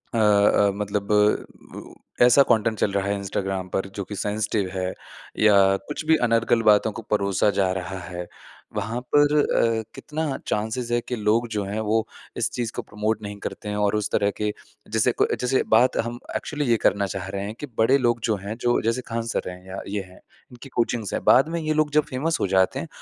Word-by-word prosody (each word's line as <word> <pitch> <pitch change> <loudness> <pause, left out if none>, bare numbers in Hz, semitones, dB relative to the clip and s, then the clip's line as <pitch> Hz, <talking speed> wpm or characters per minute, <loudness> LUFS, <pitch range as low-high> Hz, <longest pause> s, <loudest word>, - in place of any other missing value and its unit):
अ, - - +1
अ, 105 -1 +4
मतलब 100 0 -3 1.1
ऐसा 125 +3 +7
कंटेंट 110 -1 +2
चल 100 - +1
रहा 100 0 -1
है 100 - 0
इंस्टाग्राम 95 -1 -3
पर 95 +1 -2
जो 100 - -3
कि 105 - -5
सेंसिटिव 105 0 -1
है 95 -1 -2 0.5
या 105 -1 +5 0.3
कुछ 150 - -4
भी 160 +1 +5
अनर्गल 115 0 +2
बातों 105 0 +4
को - - -6
परोसा 100 -1 +2
जा 95 -2 +2
रहा 95 0 -5
है। 90 0 -6 0.5
वहाँ 115 +3 -2 0.2
पर 145 0 +5
अ, 115 -5 +2
कितना 150 -2 -3
चान्सेज़ 110 +3 -2
है 120 - +3
कि 125 - -2
लोग 110 +2 +1
जो 105 - 0
हैं 100 +3 -3
वो 110 +1 0 0.3
इस - - 0
चीज़ 120 -3 -3
को - - -2
प्रमोट 110 0 -2
नहीं 100 0 -6
करते 105 - -6
हैं 105 - -2
और 105 0 +1
उस 105 -1 -1
तरह 100 -1 +2
के 105 -1 -1 0.4
जैसे 110 +3 +3
कोई - - +1
जैसे 125 +1 +1
बात 120 +3 +4
हम 120 +1 -5 0.2
एक्चुअली 150 -1 -2
ये 115 - +4
करना 100 +1 +3
चाह 95 -3 -4
रहे 100 0 -4
हैं 105 +2 -6
कि - - -4
बड़े 115 +5 +4
लोग 120 -3 +1
जो 110 - +3
हैं 105 +2 -4
जो 120 0 +2
जैसे 115 +3 0
खान 115 0 -2
सर - - -2
हैं 90 0 -10
या 95 +1 -6
ये 100 +1 -2
हैं, 90 0 -16 0.3
इनकी 125 +3 -12
कोचिंग्स 115 -4 -1
हैं - - -2
बाद 135 +5 +5
में 170 +1 -2
ये 155 0 0
लोग 155 -1 +1
जब - - +1
फ़ेमस 155 +6 -1
हो - - +1
जाते 95 0 +3
हैं, - - -5
110 Hz, 215 wpm, -24 LUFS, 100-120 Hz, 1.1 s, ऐसा